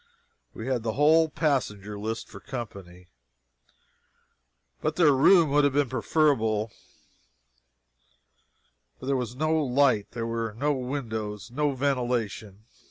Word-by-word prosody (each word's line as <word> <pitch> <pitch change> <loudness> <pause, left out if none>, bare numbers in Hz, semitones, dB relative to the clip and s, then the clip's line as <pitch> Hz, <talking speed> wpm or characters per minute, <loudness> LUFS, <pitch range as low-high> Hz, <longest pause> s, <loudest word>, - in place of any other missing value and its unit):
We 110 - -6
had 130 -2 -1
the 110 -1 -2
whole 160 +4 +4
passenger 105 - -1
list 110 +2 -4
for - - -11
company, 95 -8 -8 1.7
but - - -1
their 165 -4 +5
room 160 +3 +5
would 145 +1 +4
have 145 -1 +2
been 145 -2 +1
preferable, 115 -6 +1 2.3
for - - -9
there 135 +1 +1
was 125 -2 -3
no 155 +4 0
light, 130 -5 +2
there 115 -1 -3
were 115 -1 -3
no 145 +3 +1
windows, 110 -7 -4
no 145 +2 0
ventilation. 120 -6 -2
125 Hz, 120 wpm, -26 LUFS, 110-145 Hz, 2.3 s, their